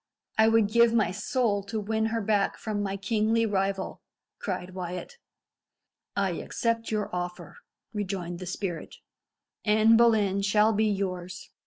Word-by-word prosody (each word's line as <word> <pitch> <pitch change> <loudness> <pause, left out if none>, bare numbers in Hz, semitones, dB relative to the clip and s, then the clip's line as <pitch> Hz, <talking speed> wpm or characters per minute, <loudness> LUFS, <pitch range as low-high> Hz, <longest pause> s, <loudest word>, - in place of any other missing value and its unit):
"I 220 0 +5
would 225 -2 +4
give 235 +2 +4
my 220 -5 +3
soul 210 +1 0
to 220 +1 -3
win 220 +1 0
her 225 0 -1
back 205 -1 +1
from 210 -2 -3
my 195 -1 -2
kingly 220 +3 +1
rival," 195 -2 -1 0.4
cried 185 -1 -4
Wyat. 180 - -6 1.0
"I 195 -2 +1
accept 230 -1 -1
your 210 -4 -2
offer," 180 - -5 0.4
rejoined 185 -4 -3
the 185 - -7
spirit. 180 -2 -4 0.7
"Anne 220 +1 +5
Boleyn 215 -4 +3
shall 210 +2 +3
be 215 +1 +2
yours. 185 -3 -3
205 Hz, 140 wpm, -27 LUFS, 190-220 Hz, 1.0 s, I